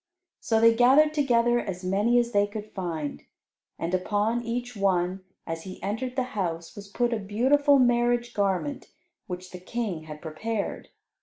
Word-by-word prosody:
So 225 -1 +1
they 230 0 +6
gathered 270 +6 +5
together 240 -5 +3
as 185 -4 -5
many 205 +6 +2
as 240 0 +2
they 205 -2 +3
could 210 0 -8
find. 165 -6 -4 0.6
And 170 +2 -3
upon 210 +5 0
each 245 +1 -4
one, 190 -1 0 0.2
as 165 0 -4
he 185 +1 -9
entered 245 +5 -3
the 260 - +1
house, 170 -5 -3
was 205 0 -9
put 240 +4 0
a 225 - -1
beautiful 265 +8 +3
marriage 240 -1 +2
garment, 200 +8 -1 0.4
which 180 0 -7
the 180 - -8
King 185 -5 -4
had 150 -1 -8
prepared. 200 +8 -4
215 Hz, 160 wpm, -26 LUFS, 185-240 Hz, 0.6 s, they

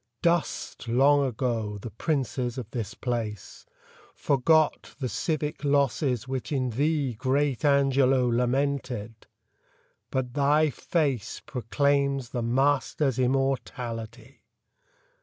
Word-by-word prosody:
Dust, 170 -7 0
long 140 +4 +4
ago, 115 -4 -2
the 115 +2 -7
princes 125 -2 -2
of 115 -3 -6
this 115 -2 -4
place; 115 -5 -4 0.5
Forgot 150 +3 +2
the 130 - -1
civic 150 +1 -2
losses 140 -3 +1
which 130 +1 -4
in 130 -4 0
thee 145 +1 0
Great 135 +3 0
Angelo 135 -3 +3
lamented; 125 -2 -1 0.8
but 125 -2 -2
thy 150 +2 +3
face 140 - -1
Proclaims 140 +1 0
the 120 - -3
master's 135 +2 +1
immortality! 125 -2 -2
130 Hz, 100 wpm, -27 LUFS, 120-140 Hz, 0.8 s, long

